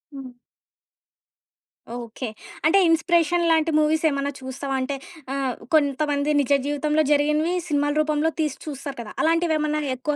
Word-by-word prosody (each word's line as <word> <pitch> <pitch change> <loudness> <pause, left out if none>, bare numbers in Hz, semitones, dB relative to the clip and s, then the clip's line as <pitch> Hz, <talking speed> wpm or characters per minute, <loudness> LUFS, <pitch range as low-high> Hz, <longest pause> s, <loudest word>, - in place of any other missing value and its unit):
హ్మ్. 265 -2 -8 1.7
ఓకే. 240 +1 -6 0.4
అంటే 390 +5 +5
ఇన్స్‌పిరేషన్ 340 +1 +2
లాంటి 320 0 +2
మూవీసేమన్నా 300 -2 +1
చూస్తావా? 270 +1 -5
అంటే 275 +2 -2 0.4
ఆహ్, 270 -3 -1 0.2
కొంతమంది 290 0 +1
నిజ 280 - -3
జీవితంలో 300 +2 +1
జరిగినవి 300 +4 +2
సినిమాల 290 -1 +1
రూపంలో 305 +1 +1
తీసి 300 -3 -1
చూస్తారు 280 -2 -6
కదా. 215 - -9
అలాంటివేమన్నా 315 -2 +1
ఎక్కువ 290 +4 -2
300 Hz, 120 wpm, -23 LUFS, 280-315 Hz, 1.7 s, అంటే